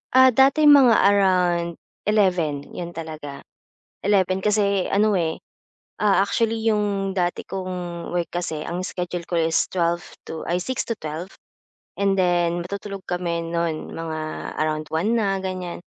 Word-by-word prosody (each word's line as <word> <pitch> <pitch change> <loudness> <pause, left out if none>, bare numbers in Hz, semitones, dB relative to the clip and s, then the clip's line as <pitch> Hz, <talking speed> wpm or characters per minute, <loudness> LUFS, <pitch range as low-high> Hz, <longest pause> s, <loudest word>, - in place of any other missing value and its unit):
Ah, 260 0 +8
dati 270 +5 +4
mga 280 -5 +8
around 180 -4 +3 0.3
11, 180 -9 +2
'yon 175 -1 -7
talaga. 155 -4 -7 0.6
11 190 -2 +2
kasi 200 -2 +2
ano, 210 0 +3
eh, 160 -1 -1 0.7
ah, 200 -2 +4
actually 225 +2 0
yung 205 -2 +1
dati 175 -1 -1
kong 180 -2 -5
work 175 -1 -1
kasi 165 -3 -3
ang 180 +3 -4
schedule 180 -1 -4
ko 175 - -2
is 160 0 +2
12 170 -1 +1 0.3
to 160 - -6
ay, 175 +1 0
6-12, 185 -9 -4 0.7
and 195 -1 +2
then 175 -1 +1
matutulog 200 0 -6
kami 170 -2 -2
no'n, 165 -1 -2
mga 160 -1 -4 0.4
around 155 0 -1
1 185 +8 +1
na, 195 -3 +1
ganiyan. 185 -2 -4
180 Hz, 135 wpm, -23 LUFS, 170-200 Hz, 0.7 s, Ah